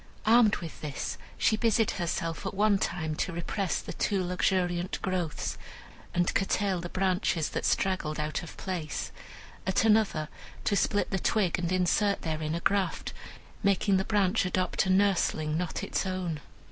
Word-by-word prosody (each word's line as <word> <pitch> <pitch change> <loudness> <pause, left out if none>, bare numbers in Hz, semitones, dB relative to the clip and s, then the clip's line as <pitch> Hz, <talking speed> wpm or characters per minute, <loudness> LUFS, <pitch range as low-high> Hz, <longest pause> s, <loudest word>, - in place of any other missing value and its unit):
Armed 220 -1 +6
with 165 -2 -8
this, 145 -3 -4 0.2
she 220 - +3
busied 225 -1 +2
herself 165 -1 -2
at 195 - -4
one 205 0 +3
time 160 -4 -1
to 185 - -1
repress 170 +1 -2
the - - -7
too 195 -3 0
luxuriant 180 0 0
growths, 180 -5 -2 0.5
and 175 0 +1
curtail 195 -2 +1
the 175 - -5
branches 185 -4 +1
that - - -3
straggled 175 -5 0
out 150 0 -2
of 165 - -10
place; 175 -6 -4 0.6
at 190 +3 +2
another, 210 -8 +3 0.4
to 205 - +1
split 205 +1 +1
the 190 - 0
twig 185 -3 +1
and 175 0 -1
insert 185 +3 +2
therein 155 -1 -2
a 170 - -3
graft, 195 -3 0 0.5
making 200 -1 +3
the 190 - +1
branch 205 0 +2
adopt 185 +1 0
a - - 0
nursling 185 -5 +2
not 175 +1 -2
its - - -1
own. 180 -4 -2
185 Hz, 160 wpm, -29 LUFS, 170-200 Hz, 0.6 s, Armed